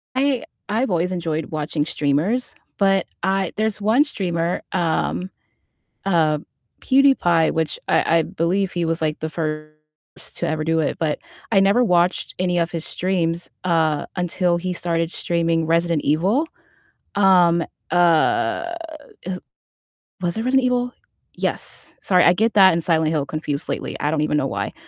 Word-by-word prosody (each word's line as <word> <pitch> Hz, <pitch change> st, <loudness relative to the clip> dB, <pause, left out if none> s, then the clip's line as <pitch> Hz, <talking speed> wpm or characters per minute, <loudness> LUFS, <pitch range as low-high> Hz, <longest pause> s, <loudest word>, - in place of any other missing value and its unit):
I've 260 Hz, -3 st, -1 dB
always 175 Hz, 0 st, 0 dB
enjoyed 165 Hz, -3 st, -2 dB
watching 150 Hz, -1 st, -2 dB
streamers, 160 Hz, -, 0 dB, 0.2 s
but 195 Hz, -2 st, +2 dB, 0.2 s
I 190 Hz, -1 st, 0 dB
there's 215 Hz, -1 st, -1 dB
one 225 Hz, +7 st, +4 dB
streamer, 175 Hz, -, -2 dB
um, 180 Hz, +1 st, -1 dB, 0.8 s
uh, 160 Hz, -5 st, +2 dB, 0.4 s
PewDiePie, 260 Hz, -, +3 dB
which 160 Hz, -2 st, -1 dB
I 165 Hz, -, +3 dB
I -, -, +3 dB
believe 180 Hz, +5 st, -1 dB
he 175 Hz, -1 st, -1 dB
was, 165 Hz, 0 st, -1 dB
like, 155 Hz, -1 st, -1 dB
the 160 Hz, -, -3 dB
first 155 Hz, -1 st, -4 dB, 0.6 s
to -, -, -2 dB
ever 155 Hz, 0 st, -1 dB
do 165 Hz, 0 st, +1 dB
it, 150 Hz, -, -2 dB
but 155 Hz, -2 st, -1 dB, 0.3 s
I 195 Hz, -, +5 dB
never 200 Hz, +5 st, +4 dB
watched 180 Hz, -3 st, +1 dB
any 180 Hz, -1 st, 0 dB
of 170 Hz, 0 st, 0 dB
his 165 Hz, -1 st, -4 dB
streams, 175 Hz, -2 st, -1 dB, 0.2 s
uh, 160 Hz, -4 st, +1 dB
until 180 Hz, 0 st, +1 dB
he 185 Hz, +1 st, -3 dB
started 165 Hz, -1 st, 0 dB
streaming 165 Hz, -1 st, 0 dB
Resident 165 Hz, -1 st, +1 dB
Evil. 190 Hz, -, +2 dB, 0.7 s
Um, 180 Hz, -4 st, +4 dB, 0.3 s
uh, 175 Hz, -, +2 dB, 0.5 s
is 185 Hz, 0 st, -4 dB, 0.8 s
was 175 Hz, +1 st, -1 dB
it 225 Hz, -, -1 dB
Resident 265 Hz, +1 st, +2 dB
Evil? 250 Hz, 0 st, 0 dB, 0.4 s
Yes. -, -, 0 dB
Sorry, 180 Hz, -2 st, +4 dB
I 175 Hz, -, +6 dB
get 220 Hz, +5 st, +1 dB
that 190 Hz, -3 st, +7 dB
and 165 Hz, 0 st, -1 dB
Silent 160 Hz, -2 st, +2 dB
Hill 150 Hz, -3 st, 0 dB
confused 150 Hz, -2 st, -3 dB
lately, -, -, -3 dB
I 145 Hz, -, 0 dB
don't 155 Hz, -1 st, 0 dB
even 150 Hz, 0 st, +1 dB
know -, -, 0 dB
why. -, -, -3 dB
175 Hz, 150 wpm, -21 LUFS, 160-195 Hz, 0.8 s, that